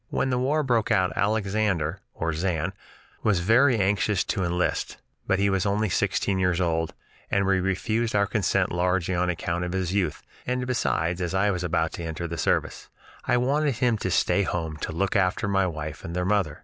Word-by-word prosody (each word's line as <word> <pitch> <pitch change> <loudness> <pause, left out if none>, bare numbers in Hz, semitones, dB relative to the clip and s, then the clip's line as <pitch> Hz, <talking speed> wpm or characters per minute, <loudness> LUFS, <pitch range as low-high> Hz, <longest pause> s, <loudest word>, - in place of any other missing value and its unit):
When 130 - 0
the 125 - +1
war 145 +4 +1
broke 120 -5 +1
out 95 -5 +2
Alexander 100 -5 0 0.2
(or 80 -1 -2
"Zan") 85 +1 -1 0.5
was 105 -5 +2
very 115 +7 +4
anxious 100 -1 +1
to 95 - -2
enlist, 90 0 -1 0.3
but 95 - +2
he 100 +1 +2
was 95 -2 +1
only 105 +1 +1
sixteen 95 +1 0
years 90 -1 +1
old, 80 -2 0 0.3
and 100 0 +2
we 95 0 +3
refused 110 +5 -1
our 100 0 +4
consent 95 -2 0
largely 90 +1 0
on 90 0 +1
account 85 0 -2
of 90 0 -3
his 95 -1 -1
youth, 95 -7 -1 0.2
and 125 0 -1
besides, 90 -8 0
as 90 +1 -2
I 100 +2 +3
was 90 -2 -3
about 80 -2 0
to 85 - -6
enter 80 +1 -4
the 85 0 -5
service, - - -1 0.4
I 125 -1 +2
wanted 140 +2 +1
him 120 0 +2
to - - -2
stay 100 - +2
at 95 - -1
home 80 -3 -3
to - - -4
look 95 +4 -1
after 95 0 +1
my 95 -1 +2
wife 75 -3 -6
and 85 - -6
their 90 0 0
mother. 95 -7 0
95 Hz, 200 wpm, -25 LUFS, 85-105 Hz, 0.5 s, very